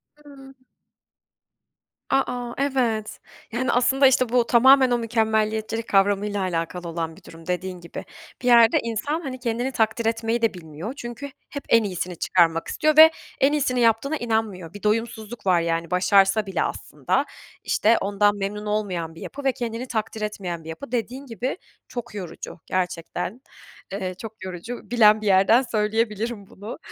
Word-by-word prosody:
Hımm. 280 -2 -15 1.5
A, 270 0 +3
a, 245 -1 -5
evet. 245 -6 -1 0.3
Yani, 250 +3 0
aslında, 270 +3 +4
işte, 260 -1 +4
bu 240 0 +2
tamamen 260 +2 +6
o 245 - +2
mükemmeliyetçilik 220 -1 0
kavramıyla 200 +1 +2
alakalı 175 -1 -3
olan 165 -1 -4
bir - - -17
durum 165 0 -13
dediğin 180 0 -3
gibi. 170 - -8 0.4
Bir - - -4
yerde 235 -2 +6
insan, 235 +8 -2
hani, 265 -5 -6
kendini 245 +1 -2
takdir 225 -1 0
etmeyi 225 +1 0
de 225 -3 +2
bilmiyor 165 +5 -7
çünkü 240 +3 -7 0.2
hep 285 - -6
en 230 - +5
iyisini 180 -2 -4
çıkarmak 165 -1 +2
istiyor 305 0 +1
ve 320 +1 +10 0.3
en 275 +2 +4
iyisini 260 -4 +1
yaptığına 235 +6 +2
inanmıyor. 220 - -2
Bir 205 - -10
doyumsuzluk 220 0 -2
var 180 -2 +4
yani 165 0 -2
başarsa 195 +3 +3
bile 195 - -1
aslında. - - -2 0.4
İşte, 225 +2 +3
ondan 205 +1 +2
memnun 205 +1 -4
olmayan 185 -6 -2
bir 165 - -12
yapı 285 +1 -8
ve 270 - +3
kendini 235 0 -4
takdir 220 -1 -3
etmeyen 180 -6 -4
bir - - -10
yapı. 230 +11 -8
Dediğin 250 +3 -3
gibi 250 +5 -4 0.3
çok 240 -2 -7
yorucu 185 -2 -7
gerçekten. 180 +4 -3 0.5
Eee, 190 -2 -3
çok 220 -2 -9
yorucu. 185 +6 -6
Bilen 215 -3 +5
bir 215 - -5
yerden 195 +5 +5
söyleyebilirim 220 -1 -1
bunu. 205 +4 -9
220 Hz, 155 wpm, -24 LUFS, 190-245 Hz, 1.5 s, ve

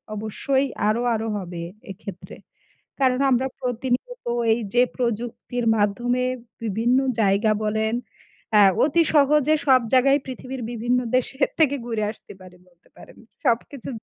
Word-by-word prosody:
অবশ্যই 265 +6 -1 0.2
আরো, 215 +3 +1
আরো 220 +1 -3
হবে 175 -3 -6 0.3
এক্ষেত্রে। 195 -1 -9 0.6
কারণ, 255 -1 +2
আমরা 255 +2 +2
প্রতিনিয়ত 250 - -3 0.3
এই 230 - -1 0.2
যে 245 - +6
প্রযুক্তির 240 0 -3
মাধ্যমে 240 +5 0 0.4
বিভিন্ন 230 +5 +1 0.2
জায়গা 205 +2 +3
বলেন 220 +1 0 0.6
আ - - +7 0.2
অতি 330 +4 +3
সহজে 300 +1 +4
সব 260 -2 +6
জায়গায় 275 +2 +5
পৃথিবীর 260 0 -7
বিভিন্ন 245 +2 0 0.2
দেশের 265 +2 +1
থেকে 290 -3 +4
ঘুরে 225 -2 -2
আসতে 220 - -14
পারি 185 -1 -14
বলতে 175 -1 -29
পারেন। - - -15 0.3
সবকিছু 245 +2 -1
245 Hz, 130 wpm, -23 LUFS, 220-265 Hz, 0.6 s, আ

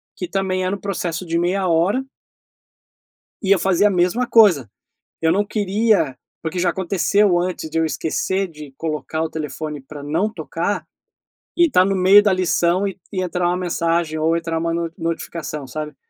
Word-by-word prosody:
que 180 - -5
também 185 -1 -1
era 185 - 0
um - - -10
processo 180 -3 -3
de 170 0 -1
meia 185 +2 0
hora 180 +11 +2 1.4
e 195 - -1
eu 200 - +6
fazia 190 +3 +3
a - - -2
mesma 185 +7 +1
coisa 195 - +5 0.5
eu 160 0 +3
não 205 +3 +2
queria 205 - +1 0.2
porque 165 +2 -3
já 175 0 +2
aconteceu 190 +2 +2
antes 175 -3 -3
de 160 - -6
eu 165 - +3
esquecer 190 +6 -1
de 150 -4 -11
colocar 155 0 -3
o 160 - -2
telefone 155 -1 -5
para 145 +2 -10
não 165 +9 -1
tocar - - -3 0.7
e 345 -1 +6
tá 180 - +5
no 195 +1 0
meio 190 +2 +7
da 205 -2 +2
lição 185 +1 +1
e 195 - -5 0.2
e 185 -2 -2
entrar 180 0 -1
uma 175 +1 +1
mensagem 170 -2 -1
ou 165 +2 +2
entrar 165 -1 -2
uma 165 0 -1
no 170 -1 -2
notificação, 165 -3 -4
sabe? 150 +3 -6
175 Hz, 180 wpm, -20 LUFS, 160-195 Hz, 1.4 s, meio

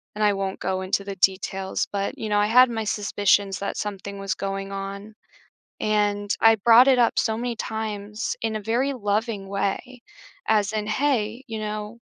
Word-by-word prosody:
and 215 - -1
I 210 - +5
won't 195 -1 -3
go 185 0 -1
into 190 +1 -1
the 195 -1 -6
details, 190 0 0
but, 200 -1 -2
you 220 - -4
know, 205 0 +2
I 205 - +3
had 250 +3 +6
my 225 -2 -3
suspicions 205 -1 +1
that 200 - -3
something 200 -1 -5
was 195 0 -2
going 195 0 -4
on, 200 +2 -6 0.7
and 205 -1 +1
I 225 0 +6
brought 235 +4 +6
it 260 -2 +5
up 235 - +3
so 220 - +1
many 235 0 -3
times 215 -1 -4
in 225 -1 -1
a 215 - -3
very 245 +6 0
loving 210 -3 -2
way, 200 +5 -3 0.5
as 210 -2 +2
in, 215 -1 -2
"Hey, 240 -1 0
you 220 -1 -5
know, 215 +2 -5
210 Hz, 185 wpm, -24 LUFS, 200-225 Hz, 0.7 s, had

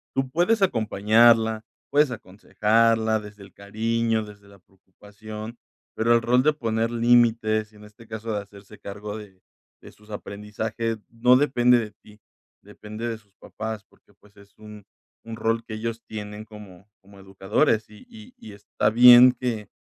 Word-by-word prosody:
Tú 135 0 0
puedes 190 +8 +1
acompañarla, 110 - +3 0.3
puedes 145 0 +3
aconsejarla 110 +1 0
desde 105 -1 -13
el 95 -2 -16
cariño, 110 +2 -2
desde 105 -1 -15
la 100 0 -18
preocupación, 105 +4 -12 0.4
pero 115 +1 +2
el 115 - +1
rol 125 +2 +3
de 155 +3 +2
poner 115 -5 -2
límites, 115 -2 +2
y - - -21
en 105 - -16
este 105 +2 -17
caso 110 +1 -6
de 105 - -2
hacerse 100 +1 -16
cargo 105 +1 -8
de 100 -3 -13 0.4
de - - -13
sus 105 +1 -23
aprendizajes 110 +2 -5
no 125 +2 +3
depende 125 -3 +3
de 110 -3 -4
ti, 105 +1 -20 0.4
depende 110 +2 -8
de 115 -1 -5
sus 100 -2 -32
papás 110 -2 -7
porque - - -29
pues 105 0 -25
es 100 0 -20
un 105 -1 -13 0.4
un 115 0 -8
rol 115 +1 -1
que 110 -1 -8
ellos 115 +1 -5
tienen 105 0 -8
como 105 -3 -14
como 100 0 -19
educadores. 100 +5 0
Y 105 - -17
y 225 +2 -14
y 110 - -12
está 105 +1 -2
bien 125 +2 +8
que 115 -5 -4
110 Hz, 165 wpm, -24 LUFS, 105-115 Hz, 0.4 s, bien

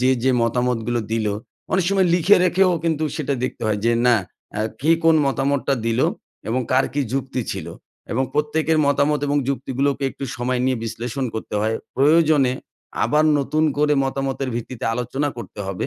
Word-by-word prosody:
যে, 130 +1 +3
যে 130 - +4
মতামতগুলো 120 0 0
দিলো 110 -3 0 0.4
অনেক 190 -2 +2
সময় 195 -2 +3
লিখে 180 +4 +5
রেখেও 185 +1 +3
কিন্তু 160 -1 0
সেটা 145 -3 -1
দেখতে 130 - -5
হয় 105 -1 0
যে 120 - +3
না 120 -1 +6 0.4
আ - - 0 0.2
কে 155 +5 +2
কোন 165 0 +6
মতামতটা 135 0 0
দিলো 115 - +2 0.4
এবং 125 +3 0
কার 130 +1 +4
কী 145 - 0
যুক্তি 135 -1 -2
ছিল - - -6 0.5
এবং 130 +3 +1
প্রত্যেকের 155 +2 +1
মতামত 145 +1 +2
এবং 145 +1 +1
যুক্তিগুলোকে 140 +1 -1
একটু 140 - -7
সময় 125 +1 -1
নিয়ে 130 0 +1
বিশ্লেষণ 120 +4 -4
করতে 110 - -5
হয়। 110 +1 0 0.2
প্রয়োজনে 150 -2 +4 0.5
আবার 150 +6 +3
নতুন 155 +3 0
করে 150 0 +3
মতামতের 135 0 -2
ভিত্তিতে 120 +1 -6
আলোচনা 125 +4 -2
করতে 110 -3 -8
হবে। 95 -2 -3
135 Hz, 165 wpm, -21 LUFS, 120-150 Hz, 0.5 s, না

